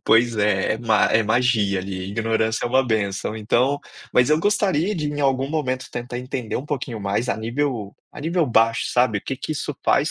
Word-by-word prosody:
Pois 115 0 +4
é, 105 -2 +2
é - - -6
ma 110 -2 +3
é 110 - +4
magia 110 -3 +2
ali, 95 0 -5
ignorância 110 +1 0
é - - 0
uma 130 +2 +3
bênção, 105 -2 -1
então, 125 +6 +1 0.3
mas 125 +3 +4
eu 155 - +4
gostaria 200 -2 +1
de 150 -2 -2
em 145 0 -3
algum 135 -1 +1
momento 130 -4 -2
tentar 120 0 -5
entender 125 -2 -4
um 135 - -5
pouquinho 130 -6 -3
mais 100 +4 -1
a - - 0
nível, 115 -2 -2 0.2
a - - -10
nível 165 +1 +1
baixo, 115 -1 +3
sabe. 125 -4 +2
O - - -11
que 135 - -4
que 140 +3 -4
isso 150 - -4
faz - - +3
120 Hz, 210 wpm, -22 LUFS, 110-140 Hz, 0.3 s, Pois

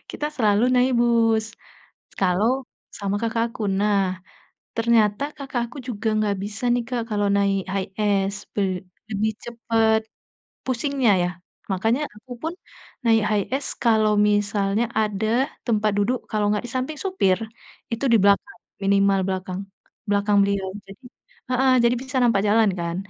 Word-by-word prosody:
kita 295 - -3
selalu 215 -1 +3
naik 255 +1 +3
bus 225 -2 +3 0.7
kalau 190 +4 +2 0.5
sama 200 0 -1
kakakku. 230 0 -1 0.2
Nah, 205 -1 +2 0.8
ternyata 230 0 +2
kakakku 255 -3 -4
juga 225 -2 -3
nggak 205 -2 +1
bisa 205 +3 -7
nih, 245 -1 0
Kak, 245 -2 -1
kalau 205 -1 +1
naik 200 -1 +2
HiAce, 195 0 -1
be 205 - -1 0.5
lebih 215 +1 0
cepet 225 -2 +1 0.7
pusingnya, 260 -1 +1
ya. 175 - 0 0.4
Makanya 225 +9 +1
akupun 245 +9 -7 0.5
naik 225 -1 +4
HiAce 230 +7 -1
kalau 220 -2 +4 0.2
misalnya 205 +1 +1 0.2
ada 210 0 -1 0.4
tempat 215 -2 +2
duduk, 220 +5 +1
kalau 210 -2 +1
nggak 210 - -1
di - - -10
samping 265 +4 -2
supir, 370 - +1 0.5
itu 230 +4 -2
di - - +7
belakang, 200 +11 +2 0.3
minimal 195 0 +3
belakang, 185 -1 -3 0.5
belakang 205 0 +2
beliau. 200 -1 -1 0.2
Jadi 195 +6 -14 0.5
heeh, 260 +1 +3
jadi 235 +1 +4
bisa 260 0 -4
nampak 230 -5 +3
jalan 220 0 +4
kan, 170 0 -2
215 Hz, 130 wpm, -23 LUFS, 200-240 Hz, 0.8 s, di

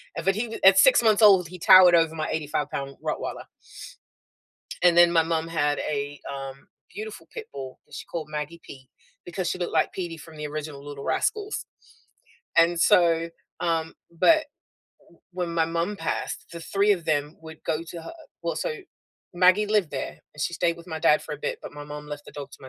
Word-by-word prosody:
and - - -4
but 195 0 +3
he 225 +1 -3
at 190 0 +8
6 255 +6 +7
months 220 -1 +3
old, 190 -5 +7
he 180 - -9
towered 185 0 +8
over 165 -1 +3
my 155 -1 -3
eighty-five-pound 145 -2 -3
Rottweiler. - - -4 1.4
And 175 -1 +5
then 175 0 +7
my 165 -1 +4
mum 165 0 -1
had 145 -3 0
a, 145 -1 -3
um, 135 0 -8 0.3
beautiful 210 -6 -8
pit - - -6
bull 130 -2 -8
that - - -13
she - - -7
called 165 -3 -5
Maggie 150 +2 -5
Pete 130 -1 -13 0.4
because 175 +1 -3
she - - -2
looked 175 - -3
like - - +1
Petey 170 -3 -5
from 160 0 -13
the 150 0 -5
original 150 -1 -6
Little 145 -1 -8
Rascals. 420 0 -1 0.9
And 170 +1 +4
so, 170 -1 +4 0.3
um 165 -2 -1 0.2
but 310 - +4 0.6
w 170 - -24
when 175 -2 -3
my 165 -1 +2
mum 170 +5 -2
passed, 165 - -3
the 170 - -7
3 200 +4 +2
of 175 -5 -3
them 150 0 -1
would 160 -1 -11
go 155 - 0
to 170 -1 -8
her 165 - -8 0.3
well, - - -2
so - - -2 0.6
Maggie 185 +4 +4
lived 205 -6 +1
there, 135 - -4 0.2
and 150 - -11
she 170 - -1
stayed 170 0 0
with 170 +1 -14
my 160 -2 -5
dad 150 - +4
for 150 - -6
a - - -11
bit, - - -3
but - - -9
my 145 0 -9
mom 150 0 -8
left 145 0 -8
the - - -10
dog 145 -2 -8
to - - -13
my 130 - -11
165 Hz, 205 wpm, -25 LUFS, 150-180 Hz, 1.4 s, at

